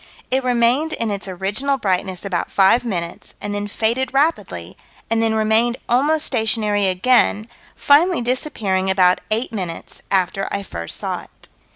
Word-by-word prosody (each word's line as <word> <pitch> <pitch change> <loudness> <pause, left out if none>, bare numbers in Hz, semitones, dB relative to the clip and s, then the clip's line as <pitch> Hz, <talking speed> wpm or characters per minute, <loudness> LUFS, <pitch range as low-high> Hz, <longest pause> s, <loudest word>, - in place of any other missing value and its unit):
"It 260 +1 +2
remained 250 +5 +2
in 230 -2 -1
its 200 -1 -5
original 200 +10 -1
brightness 190 -4 -2
about 180 -3 -2
five 195 +5 +4
minutes, 175 -7 -5
and 205 0 -5
then 205 0 -3
faded 235 +6 -1
rapidly, 305 +4 -1 0.4
and 225 0 +2
then 225 -1 +1
remained 220 +3 +2
almost 295 +6 +2
stationary 215 -4 +1
again, 210 +2 +2 0.3
finally 310 0 +3
disappearing 215 -7 -1
about 185 -1 +3
eight 225 +3 -1
minutes 185 -6 -6
after 195 +1 0
I 200 - -3
first 85 - -6
saw - - -3
it." - - -16
220 Hz, 150 wpm, -20 LUFS, 195-250 Hz, 0.4 s, five